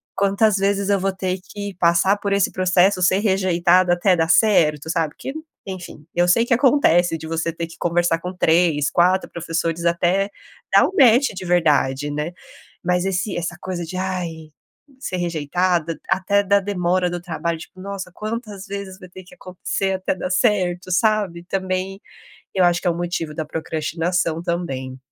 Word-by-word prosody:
quantas 200 +1 +2
vezes 200 0 0
eu 200 -1 +3
vou 195 +1 -1
ter 185 -1 -3
que 200 +1 -7
passar 175 +3 +3
por 200 -1 -2
esse 200 -2 +2
processo, 185 +1 +2
ser 185 +2 +4
rejeitada 185 -3 +3
até 180 +1 +3
dar 165 0 +1
certo?". 160 -7 +3
Sabe? 165 -3 -1
Que 270 - -6 0.3
enfim, 180 -6 -8
eu 175 0 +3
sei 230 +7 +4
que 245 - +1
acontece 205 - +3
de 160 - -9
você 165 0 -2
ter 170 0 -4
que 165 - -14
conversar 175 -1 +1
com 180 +2 -6
3, 160 -4 +2
4 180 +2 +2
professores 165 0 -2
até 175 +4 +1 0.5
dar - - +7
um - - -6
match 250 +2 +6
de 185 0 -6
verdade, 145 -5 +1
né? 150 +4 -3 0.5
Mas 180 +1 +1
esse 195 0 -1
essa 175 0 -3
coisa 180 -2 -4
de: 185 +3 -6
"Ai, 175 -4 -4 0.5
ser 185 -8 -4
rejeitada". 170 0 -1
Até 200 +2 +2
da 200 +1 +3
demora 180 -2 0
do 175 - -4
trabalho 170 -1 -3
tipo: 185 - -13
"Nossa, 195 -2 -6
quantas 215 -1 -6
vezes 195 -1 -7
vai 180 - -12
ter 185 +1 -12
que 180 - -17
acontecer 190 0 -3
até 190 0 -1
dar 185 - -4
certo?". 185 -4 +1
Sabe? 200 -3 +1
Também, 190 +1 -3 0.6
eu 185 - +3
acho 175 0 +3
que 180 - +1
é - - +3
um - - -6
motivo 170 -3 -3
da 155 - -3
procrastinação, 165 +2 -2
também. 135 -7 -4
180 Hz, 175 wpm, -21 LUFS, 170-195 Hz, 0.6 s, dar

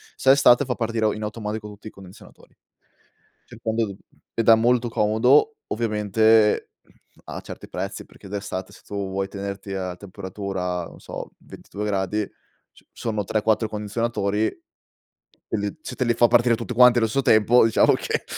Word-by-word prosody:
Se 135 - +1
è - - +10
estate, 140 -1 +5
fa 125 - -2
partire 115 -2 0
in 110 - -6
automatico 105 0 -5
tutti 105 +1 -11
i - - -5
condizionatori. 95 -1 -16 0.9
Cercando 110 -3 -3 0.4
ed 115 - -1
è 115 - +9
molto 120 +1 +2
comodo, 125 - +3
ovviamente, 110 0 +2 0.6
ha - - -7
certi - - -10
prezzi - - -5
perché, - - -15
d'estate, 95 -2 -5
se - - -16
tu 100 - -8
vuoi 95 0 -2
tenerti 100 0 -6
a 95 -2 -4
temperatura, 95 -2 -5
non - - -13
so, - - -8
22 105 - -9
gradi 100 +1 -1 0.4
s-sono 110 -3 -5
3, 110 +2 -1
4 110 +1 +1
condizionatori. 105 0 -2 1.3
Se - - -7
te 130 - 0
li 120 - +2
fa 120 +1 +4
partire 120 0 +4
tutti 120 +2 -5
quanti 125 0 +6
allo 115 -1 +3
stesso 135 +4 -1
tempo, 110 +3 +5
diciamo 115 - +4
che - - -2
110 Hz, 155 wpm, -23 LUFS, 100-115 Hz, 1.3 s, è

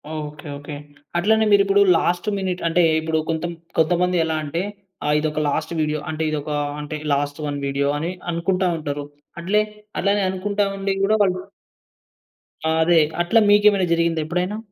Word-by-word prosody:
Okay. 150 0 -7
Okay. 145 +1 -8 0.4
అట్లనే 220 +5 +3
మీరు 200 -1 +6
ఇప్పుడు 200 +1 +4 0.2
లాస్ట్ 175 +2 0
మినిట్ 185 -2 -2
అంటే 170 +2 +3 0.2
ఇప్పుడు 160 0 -1
కొంత 165 +1 -1 0.3
కొంతమంది 180 +2 +2
ఎలా 160 -1 -1
అంటే 160 +4 -2 0.4
ఆహ్, 150 0 +2
ఇదొక 155 0 -1
లాస్ట్ 160 +3 -2
వీడియో 150 0 -1
అంటే 160 0 -2
ఇదొక 150 0 -3
ఆహ్, 145 0 -2
అంటే 150 +1 -5 0.2
లాస్ట్ 145 +1 -1
వన్ 145 - -3
వీడియో 140 0 0
అని 165 +4 -2 0.2
అనుకుంటా 180 +2 0
ఉంటారు. 145 -2 -4 0.4
అట్లే 210 +5 +2 0.4
అట్లనే 200 0 +2
అనుకుంటా 200 +2 -1
ఉండి 195 0 -1
కూడా 210 +2 +3
వాళ్ళు 185 -2 +2 1.2
ఆ! - - +2
అదే. 170 0 +5 0.2
అట్ల 175 +7 +2
మీకేమైనా 205 -2 +5
జరిగిందా 170 -1 +1
ఎప్పుడైనా? 180 +5 -2
170 Hz, 160 wpm, -22 LUFS, 150-190 Hz, 1.2 s, మీరు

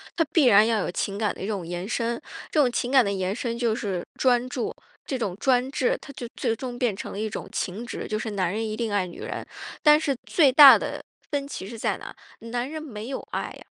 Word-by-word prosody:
她 330 - +2
必 315 -6 +5
然 215 -2 +7
要 225 -2 +2
有 180 - -2
情 195 +2 -2
感 210 -1 0
的 - - -11
一 195 - -3
种 200 -5 -3
延 175 +3 -5
伸。 235 0 -2 0.3
这 310 - +2
种 265 - +5
情 245 +1 -2
感 265 -2 +6
的 200 - 0
延 190 0 -1
伸 235 -1 -3
就 235 -2 +1
是 190 -6 -3
专 250 -1 +3
注。 250 -2 -3 0.3
这 265 - -1
种 210 -7 -2
专注， 270 - +1
它 280 - -10
就 245 -3 -7
最 235 -3 0
终 245 +1 -6
变 245 -4 +1
成 195 - -7
了 - - -6
一 215 +1 -2
种 - - -6
情 205 +6 -4
执， - - -5
就 215 - -1
是 220 0 -4
男 185 -4 0
人 220 +2 -2
一 215 - -3
定 225 -1 -2
爱 200 -3 +1
女 175 - -11
人。 - - -4 0.4
但 300 -2 +7
是 300 -3 0
最 295 -6 +4
大 275 0 +10
的 - - -5 0.3
分 280 -1 -1
歧 190 - -6
是 225 +3 -8
在 - - 0
哪？ - - -9 0.4
男 245 +2 -2
人 310 0 -6
没 220 -6 -7
有 265 - -5
爱 - - -2
啊。 - - -9
235 Hz, 275 characters per minute, -25 LUFS, 205-265 Hz, 0.4 s, 大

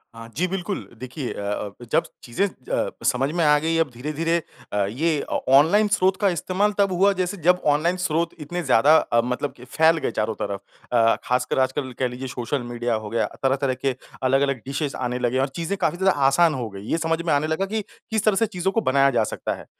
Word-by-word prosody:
हाँ 115 0 -9
जी 180 +2 +1
बिल्कुल। 190 +1 -4
देखिए 130 +1 -5
अ - - -6 0.3
अब 100 - -13 0.2
जब - - +3 0.2
चीज़ें 120 +11 0
अ, 130 -9 -3 0.2
समझ 135 +1 +2
में 170 - +2
आ 150 0 +5
गई 165 +2 0
अब 165 -3 +2
धीरे, 135 +6 -5
धीरे 165 +3 +1 0.4
अ, 100 -1 +2
ये 150 +8 0
ऑ - - -2 0.2
ऑनलाइन 200 +9 +5
स्रोत 190 -2 +2
का 200 -2 +2
इस्तेमाल 185 +4 0
तब 200 -2 +3
हुआ 195 +3 +4
जैसे 185 +1 -2
जब 180 +1 +4
ऑनलाइन 160 +5 +2
स्रोत 170 -1 0
इतने 175 +4 -4
ज़्यादा 140 +2 +5
अ, 115 - +2
मतलब 125 +3 -2 0.2
फैल 160 +1 +4
गए 135 - -2
चारों 110 0 -1
तरफ। 100 -1 -3 0.3
अ, 115 -2 +4
खासकर 125 +1 0
आजकल 130 0 0
कह 130 - +2
लीजिए 125 +2 -6
सोशल 125 +2 -3
मीडिया 120 0 -2
हो 110 -1 -3
गया, 115 - 0 0.2
तरह-तरह 135 0 +1
के 135 - +1 0.3
अलग-अलग 135 +1 +2
डिशेज़ 140 +1 -3
आने 125 -1 -2
लगे 125 +1 0
और 135 - +2
चीज़ें 170 +4 -2
काफ़ी 175 - 0
ज़्यादा 190 0 +3 0.2
आसान 160 +3 +4
हो 120 -4 -4
गई। 100 -1 -9
ये 165 - +2
समझ 165 0 0
में 170 -2 0
आने 145 +2 +1
लगा 160 +5 0
कि 215 +2 -2
किस 220 +1 -5
तरह 215 -3 +4
से 225 - +3
चीज़ों 190 -3 -2
को 225 - +1
बनाया 140 -2 +3
जा 115 -3 +2
सकता - - -3
है। - - -12
150 Hz, 225 wpm, -23 LUFS, 125-175 Hz, 0.4 s, आ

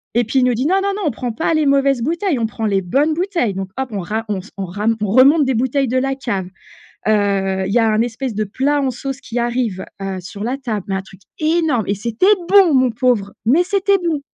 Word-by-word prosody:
Et 240 - +4
puis 235 +4 0
il - - +3
nous 250 - +2
dit: 245 +4 -1
«Non, 375 +5 +3
non, 400 +1 0
non, 415 - -4
on 300 - +2
prend 245 +1 -4
pas 225 - -1
les 310 -1 +2
mauvaises 275 -2 +2
bouteilles, 330 - -1
on 225 - 0
prend 220 +1 -5
les 200 -2 +1
bonnes 275 - +1
bouteilles». 340 - -1
Donc 190 0 -4
hop, 265 -1 -2
on 205 - -3
ra 215 +5 -3
on 205 - -1
s 185 - -12
on 195 - -3
ra 205 +4 -4
on 210 - 0
remonte 275 +6 +6
des 265 - +1
bouteilles 260 +3 0
de 255 - 0
la 270 +1 0
cave, 225 -9 -3 0.6
heu. 195 -3 +1
Il 195 - -2
y 240 - +4
a 225 -1 +3
un 215 +1 +2
espèce 240 +1 -3
de 215 - 0
plat 275 +8 0
en 265 -2 0
sauce 270 +2 -5
qui 240 -3 -7
arrive, 235 -5 -1 0.2
heu, 195 -1 -3
sur 200 +3 -8
la 250 +4 -2
table, 225 -8 -4
mais 195 - 0
un 190 - -2
truc 190 +1 -17 0.2
énorme. 310 - +1
Et 200 - 0
c'était 235 - +2
bon, 385 -5 +6
mon 255 -2 +3
pauvre, 225 -4 0
mais 290 +10 +4
c'était 395 +1 +2
bon! 335 -5 -2
245 Hz, 260 wpm, -18 LUFS, 210-285 Hz, 0.6 s, remonte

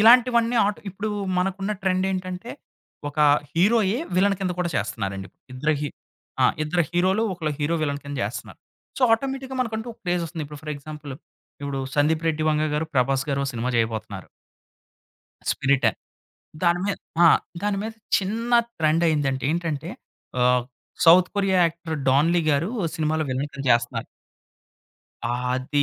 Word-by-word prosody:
ఇలాంటివన్నీ 235 +1 +6
ఆటొ 205 0 -2
ఇప్పుడు 200 +4 -4 0.3
మనకున్న 195 +2 -1
ట్రెండ్ 185 -1 +1
ఏంటంటే 185 -3 -4 0.6
ఒక 145 - -9 0.4
హీరోయే 205 +4 +3 0.2
విలన్ 200 +2 +3
కింద 185 -2 0
కూడా 175 -1 0
చేస్తున్నారండి. 95 -1 -3 0.3
ఇద్దరు 150 +4 +1
హీ 150 - -1 0.5
ఆహ్ - - +4
ఇద్దరు 175 +3 +1
హీరోలు 185 +5 +2
ఒకళ్ళు 160 -4 -2
హీరో, 155 +3 +1
విలన్ 145 -1 -1
కింద 145 0 -5
చేస్తున్నారు. - - -6 0.4
సో 265 - -2
ఆటోమేటిక్‌గా 265 +2 -1
మనకంటూ 220 -1 -2
ఒక - - -23
క్రేజ్ 175 -1 0
ఒస్తుంది. 160 -2 -5
ఇప్పుడు 150 0 -10
ఫర్ 150 -1 -4
ఎగ్జాంపుల్ 150 -1 -8 0.5
ఇప్పుడు 140 -1 -3
'సందీప్ 155 +2 +2
రెడ్డి 155 -1 0
వంగ' 155 0 +1
గారు 160 +2 0
'ప్రభాస్' 135 +1 +2
గారు 140 - 0
ఒక - - -2
సినిమా 120 +2 -2
చేయబోతున్నారు. 115 -1 -2 1.2
'స్పిరిటా' 140 -1 +2 0.7
దాని 175 0 +3
మీద 200 - 0 0.3
ఆ! - - +9 0.4
దాని 205 -1 0
మీద 220 +1 -4 0.3
చిన్న 225 +5 -3 0.3
ట్రెండ్ 160 +1 +3
అయ్యిందంటే, 140 -4 0
ఏంటంటే 165 -4 -2 0.5
ఆహ్, 125 0 +4 0.4
south 180 +2 +8
Korea 195 -2 +2
actor 165 -1 -4
Don 145 +6 +4
Lee 170 - +3
గారు 150 +7 +1 0.3
సినిమాలో 155 0 0
విలన్‌గా 140 +1 -3
చేస్తన్నారు. 120 0 +1 1.2
ఆది 125 +4 0
160 Hz, 145 wpm, -24 LUFS, 140-190 Hz, 1.2 s, ఆ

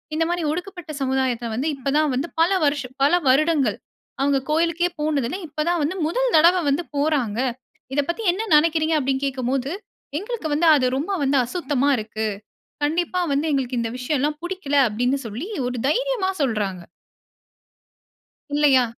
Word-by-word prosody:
இந்த 325 - +2
மாரி 350 -1 -1
ஒடுக்கப்பட்ட 355 -1 -6
சமுதாயத்தை 260 -3 0
வந்து, 270 +6 -1
இப்ப 275 0 -3
தான் 305 -2 +2
வந்து 270 +6 -1
பல 335 - +5 0.2
வருஷ 285 -2 +1 0.2
பல 290 - +4
வருடங்கள், 295 +1 +3 0.4
அவங்க 275 -1 +2
கோயிலுக்கே 335 +2 +1
போனது 295 -5 0
இல்ல, 370 - -4
இப்ப 295 - -28
தான் 345 -2 +1
வந்து 360 +6 -2
முதல் - - 0
தடவ 345 +3 +6
வந்து 310 +4 0
போறாங்க. 280 -7 0 0.6
"இத 285 - +3
பத்தி 395 +7 -2
என்ன 440 +4 -4
நினைக்கிறீங்க?" 320 +1 +3
அப்டின்னு 270 0 -1
கேட்கும்போது, 265 0 -1 0.5
"எங்களுக்கு 425 -5 -4
வந்து 330 +3 +2
அது 260 - +2
ரொம்ப 330 +9 -2
வந்து 275 0 +3
அசுத்தமா 285 -1 0
இருக்கு. 220 0 -3 0.6
கண்டிப்பா 345 +4 0
வந்து 295 +3 0
எங்களுக்கு 255 -3 -1
இந்த 225 -1 -3
விஷயம்லாம் 295 +3 -1
புடிக்கல" 350 -6 -3
அப்டின்னு 245 +6 0
சொல்லி 240 - -6 0.2
ஒரு 250 0 -3
தைரியமா - - 0
சொல்றாங்க. 205 -7 -2 1.7
இல்லையா? 280 -4 +5
290 Hz, 150 wpm, -22 LUFS, 260-335 Hz, 1.7 s, தடவ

